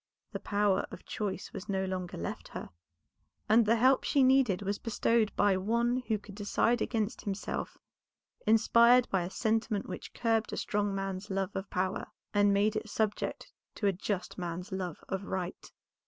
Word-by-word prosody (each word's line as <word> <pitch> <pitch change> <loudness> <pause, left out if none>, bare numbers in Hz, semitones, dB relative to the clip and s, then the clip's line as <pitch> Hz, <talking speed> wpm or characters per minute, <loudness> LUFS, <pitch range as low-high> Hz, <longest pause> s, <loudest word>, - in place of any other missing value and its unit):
The - - -4
power 205 -2 +1
of - - -11
choice 200 -3 -4
was 200 +2 -7
no 190 -1 0
longer 185 -1 -4
left 85 - -5
her, - - -8 0.8
and 220 +1 +5
the 230 - +5
help 255 +3 +4
she 280 - +3
needed 255 -7 +4
was 200 +1 -2
bestowed 230 0 +1
by 200 -2 +4
one 235 +5 +1
who 220 - +1
could 205 0 -12
decide 215 +4 +1
against 220 -2 -1
himself, 200 -1 -4 0.7
inspired 235 +3 +6
by 190 - +2
a 175 - -3
sentiment 220 0 0
which - - -7
curbed 225 -2 +1
a - - -3
strong 205 -1 -1
man's 195 0 -4
love 195 0 -2
of 195 +1 -4
power, 185 +1 -1 0.3
and 205 -1 +4
made 205 +2 +2
it 215 - -3
subject 215 0 -2 0.2
to 210 - -3
a 200 - +4
just 190 +1 -3
man's 175 +2 -5
love 185 -4 -4
of 190 0 -3
right. 185 -2 -4
205 Hz, 170 wpm, -31 LUFS, 190-225 Hz, 0.8 s, inspired